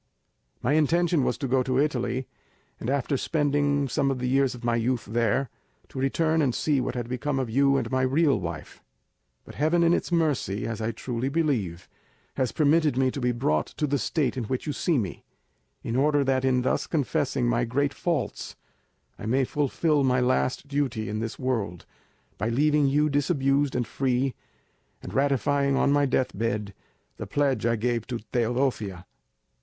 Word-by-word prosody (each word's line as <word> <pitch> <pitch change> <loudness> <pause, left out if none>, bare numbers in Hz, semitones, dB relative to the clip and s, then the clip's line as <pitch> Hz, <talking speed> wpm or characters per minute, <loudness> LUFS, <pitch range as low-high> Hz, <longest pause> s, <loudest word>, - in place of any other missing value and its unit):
My 130 - +2
intention 160 0 +2
was 120 - 0
to 135 - -3
go 130 +1 +2
to 130 0 -1
Italy, 130 -3 0 0.5
and 120 - -4
after 140 0 0
spending 145 -1 +1
some 135 +2 0
of 135 - -1
the 125 0 -2
years 135 0 +2
of 120 - -12
my 120 0 +1
youth 120 +1 0
there, 115 +3 0 0.4
to - - -7
return 160 +4 +1
and 130 -5 +1
see 145 -4 +1
what 125 - -3
had 120 -2 -3
become 130 +3 -2
of 130 -4 -2
you 140 +2 +3
and - - -2
my 130 0 +1
real 135 -1 +2
wife; 85 -4 -7 0.6
but - - -11
Heaven 160 +4 +2
in 170 0 +4
its - - -1
mercy, 145 - 0
as 115 -1 -4
I 110 - -1
truly 120 +3 -3
believe, 125 - -1 0.5
has 130 -3 -1
permitted 150 -2 +2
me 130 -1 +2
to 140 - -5
be 125 0 +2
brought 75 -11 0
to 150 - +1
the 145 -1 0
state 140 +5 0
in 125 -3 -3
which 130 +3 -3
you 150 - -2
see 165 +2 +1
me, 100 -8 -3 0.6
in 115 - -3
order 145 +2 +3
that 130 -1 +1
in 130 -1 +2
thus - - 0
confessing 145 -4 0
my 120 0 +1
great 140 +4 0
faults, 150 - -3 0.6
I - - -6
may 130 +4 +2
fulfil 145 +2 +1
my 130 -1 +2
last 130 +2 0
duty 135 -7 -1
in 110 +1 -3
this 115 +1 -4
world, 110 -9 -2 0.5
by 110 - 0
leaving 145 +4 +3
you 150 +3 +3
disabused 140 -1 +1
and 125 -1 0
free, 130 +2 0 0.7
and - - -7
ratifying 140 0 +2
on 140 - +2
my 145 0 +3
deathbed 110 -5 -1 0.4
the - - -6
pledge 135 -6 +1
I 115 - +2
gave 115 0 -1
to 125 - -3 0.2
Teodosia. 120 -6 -1
130 Hz, 180 wpm, -26 LUFS, 120-145 Hz, 0.7 s, in